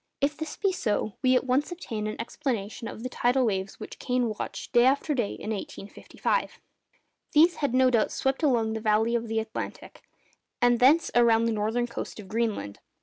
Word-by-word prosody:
If 285 Hz, +2 st, +1 dB
this 315 Hz, 0 st, -6 dB
be 395 Hz, -2 st, +1 dB
so, 215 Hz, -, -1 dB
we 255 Hz, 0 st, +4 dB
at 250 Hz, -, +3 dB
once 265 Hz, +5 st, 0 dB
obtain 225 Hz, -12 st, -4 dB
an 215 Hz, -, -5 dB
explanation 230 Hz, -3 st, -3 dB
of 225 Hz, -, -8 dB
the -, -, -2 dB
tidal 250 Hz, +1 st, +2 dB
waves 195 Hz, -3 st, -2 dB
which -, -, -9 dB
Kane 250 Hz, -2 st, 0 dB
watched 215 Hz, -, -6 dB
day 240 Hz, -1 st, +5 dB
after 280 Hz, +4 st, +2 dB
day 240 Hz, -7 st, -1 dB
in 215 Hz, -, -5 dB
1855. 205 Hz, -, -3 dB, 0.7 s
These 330 Hz, +3 st, +5 dB
had 280 Hz, -4 st, 0 dB
no 260 Hz, 0 st, +5 dB
doubt 230 Hz, -3 st, +2 dB
swept 270 Hz, +1 st, -1 dB
along 235 Hz, -7 st, +2 dB
the 220 Hz, -, -3 dB
valley 220 Hz, +1 st, +2 dB
of 235 Hz, -1 st, -1 dB
the 225 Hz, 0 st, -2 dB
Atlantic, 220 Hz, 0 st, -6 dB, 0.6 s
and 245 Hz, -1 st, +3 dB
thence 295 Hz, +6 st, +5 dB
around 230 Hz, -1 st, +4 dB
the 230 Hz, -, +1 dB
northern 220 Hz, +3 st, 0 dB
coast 235 Hz, -, -6 dB
of 205 Hz, -, -9 dB
Greenland. 215 Hz, -, -2 dB
240 Hz, 190 wpm, -27 LUFS, 220-265 Hz, 0.7 s, day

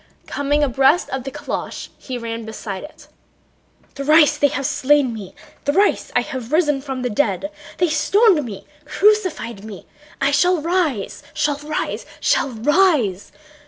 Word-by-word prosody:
Coming 290 Hz, +1 st, 0 dB
abreast 275 Hz, +5 st, +2 dB
of 265 Hz, -1 st, -4 dB
the 270 Hz, -, -4 dB
calèche 295 Hz, +2 st, -5 dB
he 255 Hz, -2 st, -6 dB
ran 230 Hz, -1 st, -5 dB
beside 215 Hz, -3 st, -6 dB
it. 300 Hz, -, -13 dB, 0.9 s
"Thrice 300 Hz, +1 st, +4 dB
have 285 Hz, -2 st, +3 dB
they 275 Hz, -, -2 dB
slain 280 Hz, -2 st, +2 dB
me, 205 Hz, -4 st, -9 dB, 0.3 s
thrice 385 Hz, +9 st, +1 dB
have 255 Hz, -3 st, -2 dB
I -, -, +3 dB
risen 295 Hz, -5 st, +2 dB
from 265 Hz, -2 st, -5 dB
the 250 Hz, -, 0 dB
dead. 290 Hz, +5 st, 0 dB, 0.3 s
They 355 Hz, -1 st, +2 dB
stoned 340 Hz, +3 st, +3 dB
me, 210 Hz, -6 st, -8 dB, 0.2 s
crucified 370 Hz, -, +1 dB
me... 215 Hz, -3 st, -10 dB, 0.3 s
I 275 Hz, +1 st, +2 dB
shall 355 Hz, +5 st, +3 dB
rise... 315 Hz, -, -1 dB
shall 290 Hz, -1 st, 0 dB
rise... 300 Hz, +1 st, -4 dB
shall -, -, +2 dB
rise. 255 Hz, -, +1 dB
285 Hz, 145 wpm, -20 LUFS, 245-310 Hz, 0.9 s, Thrice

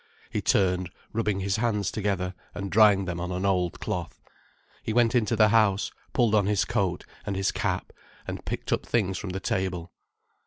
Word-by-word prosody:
He -, -, -1 dB
turned, 90 Hz, -2 st, +2 dB, 0.2 s
rubbing 105 Hz, -3 st, 0 dB
his 100 Hz, +2 st, 0 dB
hands 105 Hz, -4 st, 0 dB
together, 95 Hz, -3 st, -1 dB, 0.2 s
and 100 Hz, -1 st, -4 dB
drying 100 Hz, -1 st, +6 dB
them 90 Hz, -1 st, -3 dB
on 90 Hz, +1 st, -3 dB
an 90 Hz, +2 st, -2 dB
old 90 Hz, -3 st, +1 dB
cloth. -, -, -4 dB, 0.6 s
He 110 Hz, -, -3 dB
went 120 Hz, 0 st, +4 dB
into 115 Hz, -3 st, +2 dB
the 110 Hz, -1 st, +5 dB
house, 105 Hz, -3 st, +3 dB, 0.2 s
pulled 120 Hz, -4 st, +2 dB
on 105 Hz, -2 st, +4 dB
his 105 Hz, -2 st, +2 dB
coat 100 Hz, -7 st, -1 dB, 0.2 s
and 100 Hz, -, -3 dB
his 95 Hz, 0 st, +1 dB
cap, -, -, -2 dB, 0.3 s
and -, -, -5 dB
picked -, -, -2 dB
up -, -, +1 dB
the -, -, -19 dB
things 95 Hz, -5 st, +1 dB
from 100 Hz, -, -5 dB
the 95 Hz, +1 st, -3 dB
table. 90 Hz, -3 st, -2 dB
100 Hz, 190 wpm, -27 LUFS, 95-110 Hz, 0.6 s, drying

